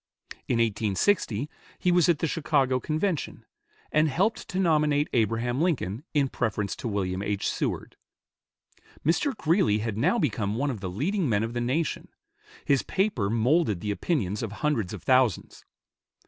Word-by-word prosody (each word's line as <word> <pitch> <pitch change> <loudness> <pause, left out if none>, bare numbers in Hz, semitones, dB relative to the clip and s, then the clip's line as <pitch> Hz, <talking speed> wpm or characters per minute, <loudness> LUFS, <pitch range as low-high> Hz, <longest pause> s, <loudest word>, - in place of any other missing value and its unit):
In - - +1
1860 115 - +1 0.3
he 180 - +1
was 175 -1 +4
at 170 - +4
the 165 - -1
Chicago 140 -4 +1
Convention, 155 +3 -2 0.5
and 155 +1 +3
helped 195 - 0
to 185 - -5
nominate 150 -5 +2
Abraham 120 +3 +1
Lincoln 140 - -1
in 140 -2 +3
preference 105 -5 -2
to - - -5
William 95 -3 -2
H. 100 -1 -1
Seward. - - -3 1.1
Mr. 215 - +1
Greeley 165 - +2
had 110 -1 -3
now 235 - +3
become 105 - -1
one 140 +4 0
of 115 - -6
the 95 -1 -4
leading 160 - -1
men 105 -1 +2
of 115 +1 -3
the 120 - -2
nation. 140 +7 -1 0.6
His 140 -2 +3
paper 190 - 0
molded 115 - +2
the 105 +3 -2
opinions 105 - -1
of 115 - -4
hundreds 110 -3 -1
of - - -7
thousands. 130 -7 +1
130 Hz, 155 wpm, -27 LUFS, 105-160 Hz, 1.1 s, was